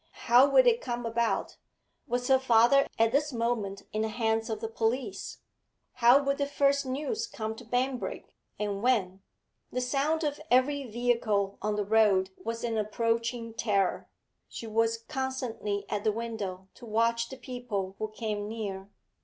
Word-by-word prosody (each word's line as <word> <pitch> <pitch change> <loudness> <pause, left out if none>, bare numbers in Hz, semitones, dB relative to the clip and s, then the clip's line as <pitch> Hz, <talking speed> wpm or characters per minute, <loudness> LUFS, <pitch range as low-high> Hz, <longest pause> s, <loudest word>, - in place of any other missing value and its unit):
How 250 +4 +6
would - - +6
it 475 -1 +4
come 240 -1 -3
about? 230 0 -1 0.5
Was 245 +1 -1
her 265 -1 +5
father 260 +2 +5
at 225 0 +3
this 295 +3 +1
moment 230 -5 -2
in 215 - 0
the 220 - +1
hands 225 0 0
of 220 -1 -2
the 225 - -3
police? 225 -1 -2 0.6
How 240 +4 +8
would 275 +1 0
the 280 - +1
first 280 -1 +2
news 305 - -2
come 220 0 -4
to 245 - -10
Banbrigg, 250 +2 -2 0.2
and 205 -1 -2
when? 200 -6 +1 0.5
The 250 - -1
sound 285 +6 0
of 295 -1 -2
every 275 +3 +3
vehicle 220 -4 0
on 210 0 -1
the 210 -1 -1
road 200 -3 +3
was 230 +1 -4
an 230 -2 0
approaching 230 +2 -1
terror; 200 -5 0 0.4
she - - -7
was 225 +1 +1
constantly 240 -6 -3
at 205 -1 -2
the 215 - +3
window 210 -5 -5
to 240 - -13
watch 230 +2 +1
the 265 - -8
people 240 -7 -4
who 215 - -1
came 215 -1 -4
near. 200 -3 -5
230 Hz, 160 wpm, -29 LUFS, 215-255 Hz, 0.6 s, How